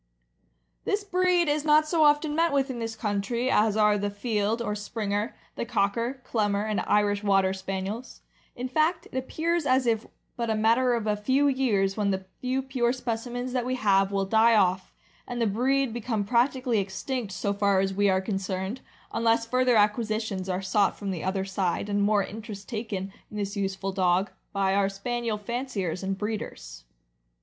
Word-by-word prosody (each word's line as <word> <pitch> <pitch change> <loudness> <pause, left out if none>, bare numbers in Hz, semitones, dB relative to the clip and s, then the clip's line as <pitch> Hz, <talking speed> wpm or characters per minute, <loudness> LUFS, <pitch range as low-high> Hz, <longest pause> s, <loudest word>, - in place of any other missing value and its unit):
This 410 0 0
breed 365 -3 +2
is 295 0 +1
not 305 0 +4
so 320 0 +3
often 295 0 +3
met 330 +1 +2
with 275 -1 +1
in 240 - -5
this 225 -1 -4
country 220 +4 -1
as 215 0 +3
are 210 -1 +4
the 205 +1 -1
Field, 210 +1 -1
or 235 -3 -2
Springer, 210 +2 -3 0.2
the - - -2
Cocker, 235 +4 -1
Clumber, 205 -4 0
and 215 -2 0
Irish 205 0 +2
Water 195 -2 +3
Spaniels; 195 +5 -5 0.3
in 250 +1 -4
fact 310 +7 +1
it - - -11
appears 320 +5 -1
as 260 0 +3
if 225 -2 0 0.3
but 235 -1 -2
a 220 - +2
matter 235 +3 +3
of 230 -2 -2
a 210 -1 +1
few 260 +7 +2
years 220 -8 +1
when 205 -1 +1
the 190 -1 -2
few 255 +1 -1
pure 255 -3 0
specimens 245 0 -3
that 250 -2 0
we 255 +1 -1
have 195 -4 +3
will 195 -1 0
die 225 +3 +4
off, 185 -2 +2 0.4
and 245 -1 -4
the 230 - +2
breed 255 +4 +1
become 225 -2 -2
practically 245 +1 +1
extinct 200 +4 -3
so 200 +2 -1
far 200 -1 +2
as 195 0 0
we 200 +1 +2
are 190 0 +2
concerned, 190 +3 -3 0.3
unless 230 0 +2
further 255 +1 +2
acquisitions 210 -2 +1
are 185 +1 -1
sought 200 +2 +2
from 200 -2 -4
the 175 -4 -4
other 190 +1 -1
side, 190 +1 -1
and 205 0 +1
more 205 0 +3
interest 210 -1 -8
taken 210 -5 -4 0.2
in 210 - -8
this 200 0 -3
useful 195 -1 -2
dog, 185 0 +1 0.2
by 195 -1 +1
our 195 0 +2
Spaniel 230 +2 -2
fanciers 210 -6 -3
and 195 0 -2
breeders. - - -5
215 Hz, 180 wpm, -27 LUFS, 195-250 Hz, 0.4 s, not